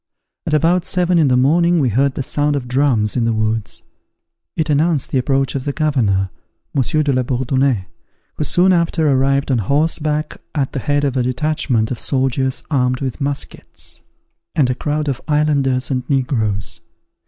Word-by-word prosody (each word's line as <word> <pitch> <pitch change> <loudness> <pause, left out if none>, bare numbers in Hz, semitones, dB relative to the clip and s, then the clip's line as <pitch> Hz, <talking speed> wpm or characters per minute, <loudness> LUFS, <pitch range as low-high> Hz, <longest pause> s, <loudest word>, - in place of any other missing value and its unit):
At 155 - +2
about 170 +4 +2
seven 180 0 +1
in 155 - +4
the 125 -1 +3
morning 170 +7 +3
we 135 -6 +2
heard 130 +5 +1
the 135 - -2
sound 145 +2 0
of 130 -3 -3
drums 125 -5 +1
in 120 -2 +1
the 115 - +1
woods: 110 0 -2 0.7
it 160 - 0
announced 150 0 +1
the 130 - +2
approach 135 0 0
of 135 - -3
the 145 - -2
governor, 110 - 0 0.4
Monsieur 150 +3 +1
de 145 -2 +1
la 130 - +2
Bourdonnais, 130 -3 0 0.5
who - - -3
soon 180 +5 +4
after 170 -2 +1
arrived 135 0 +2
on 125 - +2
horseback, 150 - 0
at 140 -3 -1
the 135 - -2
head 145 +1 0
of 135 -2 0
a - - +2
detachment 130 -3 0
of 125 - -3
soldiers 130 -1 0
armed 125 -2 +1
with 135 +1 -4
muskets, 140 0 -5 0.5
and 130 -5 +2
a - - +1
crowd 150 +3 -2
of 135 -2 -2
islanders 140 -4 +1
and 130 -1 0
negroes. 115 -8 -1
135 Hz, 175 wpm, -18 LUFS, 125-150 Hz, 0.7 s, in